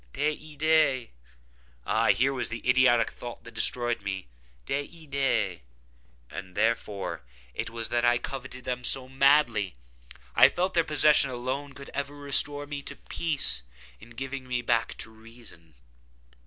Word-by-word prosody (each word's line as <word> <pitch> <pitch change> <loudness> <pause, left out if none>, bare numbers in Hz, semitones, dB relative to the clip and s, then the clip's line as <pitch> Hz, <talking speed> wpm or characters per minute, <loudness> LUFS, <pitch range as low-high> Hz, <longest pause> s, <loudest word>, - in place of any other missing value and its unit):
Des 150 +1 0
idÃ©es!—ah - - -1
here 135 +3 +2
was 125 -2 -2
the 115 +1 -6
idiotic 125 -3 +4
thought 120 -1 -9
that 115 - -11
destroyed 120 -2 0
me! 95 -1 -4 0.4
Des 140 - -2
idÃ©es!—ah, 65 - -4
therefore 100 -3 -1 0.3
it - - -3
was 115 -1 -5
that 120 0 +1
I 120 0 +4
coveted 130 0 -7
them 125 0 -3
so 130 0 +4
madly! 130 - +3 0.6
I - - +8
felt 185 +2 -1
that - - -4
their - - +4
possession 150 -2 +5
could 130 - -4
alone 135 +3 -4 0.2
ever 140 +1 -3
restore 145 0 -1
me 145 0 -5
to 140 - -7
peace, 150 - 0 0.4
in 115 - -14
giving 130 +2 -6
me 125 -1 -1
back 115 -1 0
to 110 - -6
reason. 110 - -13
125 Hz, 140 wpm, -28 LUFS, 100-140 Hz, 0.6 s, I